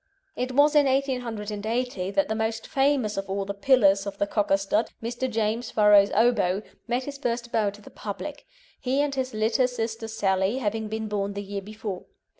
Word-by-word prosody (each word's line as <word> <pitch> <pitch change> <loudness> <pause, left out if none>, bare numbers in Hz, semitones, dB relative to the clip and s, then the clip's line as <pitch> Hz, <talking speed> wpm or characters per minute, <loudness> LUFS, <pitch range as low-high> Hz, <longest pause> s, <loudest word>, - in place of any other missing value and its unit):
It 255 +1 -2
was 290 +3 +5
in 295 -2 +5
1880 235 -5 -1
that 195 0 +1
the 220 - -1
most 220 0 -2
famous 270 -6 +1
of 195 0 -3
all 195 0 -1
the 200 - -3
"pillars" 200 -3 +4
of 200 0 -5
the 200 - +1
Cocker 200 -1 +1
stud, 195 +3 0
Mr. 240 +3 -3
James 225 +1 -1
Farrow's 210 -1 +6
Obo, 210 -4 +3 0.2
made 245 +2 0
his 280 +1 -7
first 240 -2 -2
bow 215 -2 +2
to 205 +1 -12
the - - -13
public, 285 +8 -7 0.3
he 265 +2 0
and 290 -1 0
his 260 -3 -3
litter 225 +4 +2
sister 225 -2 -4
Sally 195 0 +1
having 220 -3 -2
been 220 0 -3
born 200 -1 -2
the 200 - -4
year 200 0 -5
before. 210 -2 -6
220 Hz, 190 wpm, -26 LUFS, 200-250 Hz, 0.3 s, Farrow's